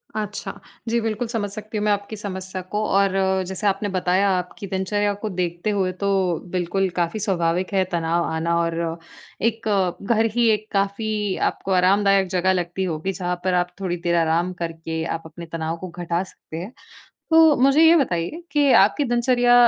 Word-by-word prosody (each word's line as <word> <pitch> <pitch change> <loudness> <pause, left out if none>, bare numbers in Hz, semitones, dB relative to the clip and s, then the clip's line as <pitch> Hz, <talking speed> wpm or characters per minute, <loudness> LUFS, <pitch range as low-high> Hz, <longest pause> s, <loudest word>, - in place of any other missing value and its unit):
अच्छा, 210 -1 -4 0.4
जी 235 +1 +2
बिल्कुल 225 +1 -2
समझ 220 -3 -2
सकती 215 +1 -6
हूँ 210 - -1
मैं 210 - +3
आपकी 205 +1 -2
समस्या 190 -2 -5
को, 210 +4 -3
और 195 -1 +3 0.4
जैसे 190 +2 -2
आपने 200 +1 0
बताया 185 +1 +2
आपकी 180 +2 -6
दिनचर्या 205 +2 0
को 215 - -2
देखते 175 +1 -2
हुए, 195 -3 +1
तो 190 -2 0
बिल्कुल 185 +1 0
काफ़ी 170 +5 0
स्वाभाविक 185 -1 0
है 190 -1 +3
तनाव 170 0 0
आना 165 +1 0
और, 165 0 -2 0.4
एक 225 -1 0 0.5
घर 225 0 +3
ही 235 -2 +4
एक 215 +1 -3
काफ़ी 205 0 -1 0.2
आपको 195 - -7
आरामदायक 195 +1 +4
जगह 185 +1 +2
लगती 180 +1 -2
होगी, 175 +2 -2
जहाँ 180 -1 -2
पर 185 - +1
आप 180 0 +1
थोड़ी 180 -2 -2
देर 175 -1 +1
आराम 170 +2 +1
करके, 165 -1 -4
आप 165 - -3
अपने 165 +1 -9
तनाव 165 0 -3
को 185 - -7
घटा 175 +1 -2
सकते 160 -3 -11
है। 185 +8 -6 0.6
तो 320 -2 +6
मुझे 275 +3 +5
ये 325 +1 +8
बताइए, 265 - -1
कि 290 -2 +3
आपकी 215 +9 +5
दिनचर्या 245 0 +3
190 Hz, 175 wpm, -22 LUFS, 175-210 Hz, 0.6 s, ये